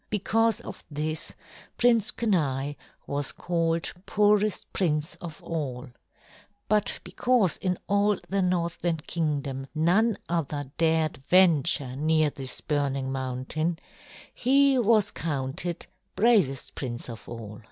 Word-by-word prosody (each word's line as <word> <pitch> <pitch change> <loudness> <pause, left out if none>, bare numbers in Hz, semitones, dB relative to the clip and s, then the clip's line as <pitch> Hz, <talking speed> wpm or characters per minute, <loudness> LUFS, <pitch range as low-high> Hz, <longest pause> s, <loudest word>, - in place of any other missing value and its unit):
Because 225 +2 +1
of - - -9
this, 155 +1 -3 0.4
Prince 235 -3 +4
Kenai 145 - 0 0.3
was 140 -1 -2
called 165 -1 -1
poorest 210 -1 +2
prince 155 -3 0
of 165 -3 -8
all; 135 -7 -4 0.8
but 210 -1 +1
because 245 -8 +2
in 180 -2 -1
all 205 0 +3
the 195 0 0
Northland 170 -2 -1
Kingdom 140 -5 -2
none 185 +8 +3
other 145 -5 -2
dared 160 -1 +2
venture 145 -5 +3
near 155 +1 +2
this 135 -2 -5
burning 140 -3 -1
mountain, 135 +6 -2 0.6
he 275 +1 +4
was 220 -3 +3
counted 155 +3 -3 0.3
bravest 200 - +2
prince 120 -3 -5
of 115 -3 -9
all. 110 -3 -8
165 Hz, 110 wpm, -27 LUFS, 140-200 Hz, 0.8 s, Prince